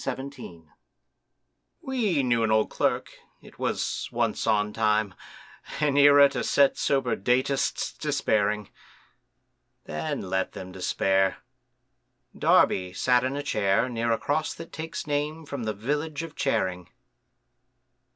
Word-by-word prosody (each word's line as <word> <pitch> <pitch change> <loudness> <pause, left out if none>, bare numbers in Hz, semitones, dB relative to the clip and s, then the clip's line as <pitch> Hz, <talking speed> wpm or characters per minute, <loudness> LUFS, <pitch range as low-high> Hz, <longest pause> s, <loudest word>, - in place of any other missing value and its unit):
THE 135 - -2
OLD 140 +1 -7
CLERK 85 -11 -11 1.2
We 215 - 0
knew 120 -2 +2
an 110 - +1
old 110 0 +2
Clerk, - - -1 0.3
it - - -17
was - - -2
"once - - -1
on 105 0 +1
time," 110 -2 +1 0.7
An 150 -2 +1
era 145 0 +7
to - - -3
set 140 -1 +3
sober 135 -3 0
datists 130 +6 0
despairing; 105 -1 0 1.1
Then 80 +5 -4
let 95 0 -1
them 95 0 -8
despair!—Darby 95 -2 -1
sat 125 +5 +2
in 130 +2 -1
a 145 - -3
chair 105 -1 +1
Near 115 -1 -1
a - - +1
cross 155 +2 -1
that 165 - -10
takes 160 +1 -5
name 150 +2 -2
from 140 -5 -5
the 110 - 0
village 150 +8 -3
of 165 -2 -9
Charing. 90 -10 -1
125 Hz, 130 wpm, -26 LUFS, 100-145 Hz, 1.2 s, era